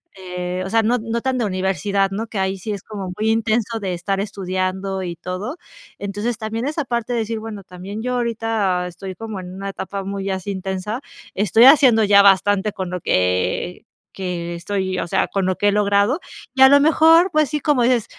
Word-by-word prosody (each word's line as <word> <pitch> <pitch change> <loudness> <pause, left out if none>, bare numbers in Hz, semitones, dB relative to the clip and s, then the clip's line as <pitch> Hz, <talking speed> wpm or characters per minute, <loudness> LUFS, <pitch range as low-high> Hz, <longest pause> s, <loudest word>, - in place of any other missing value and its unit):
eh, 180 -1 -5
o 190 - -5
sea, 225 +1 +2
no 240 +2 +2
no 230 +1 -3
tan 260 -1 -1
de 230 - +1
universidad, 195 +1 0
¿no? 220 +4 -3
Que 215 - -7
ahí 190 0 -1
sí 215 +4 -5
es 200 -3 -5
como 195 -4 -6
muy 220 +1 +1
intenso 225 0 0
de 185 -3 -3
estar 195 +3 -2
estudiando 190 -1 -3
y 175 -2 -4
todo. 185 - -5 0.4
Entonces, 205 +3 -3
también 225 +3 -3
es 305 - -4
aparte 245 -5 -2
decir, 225 -1 -2
bueno, 215 -2 -7
también 190 +4 -8
yo 250 0 -1
ahorita 225 -6 0
estoy 185 +2 -7
como 220 0 -6
en 180 -1 -8
una 195 +1 -5
etapa 195 0 -5
muy 195 0 -4
así 190 +1 -3
intensa, 190 +4 -4 0.3
estoy 210 +3 +3
haciendo 260 -5 +7
ya 200 -1 +6
bastante 200 +1 +3
con 185 -2 -5
lo 180 - -4
que 90 - 0 0.3
que 175 -2 -4
estoy 190 +1 -2
O 165 - -3
sea, - - +1
con 195 -2 -1
lo 185 - +1
que 205 - +2
he - - +2
logrado 205 - +2 0.3
y 265 - -1
a 265 - +10
lo 285 0 +7
mejor, 325 +4 +5
pues 305 -2 +2
sí, 300 -1 -1
como 285 -3 +2
dices, 240 -2 +2
200 Hz, 205 wpm, -20 LUFS, 190-230 Hz, 0.4 s, a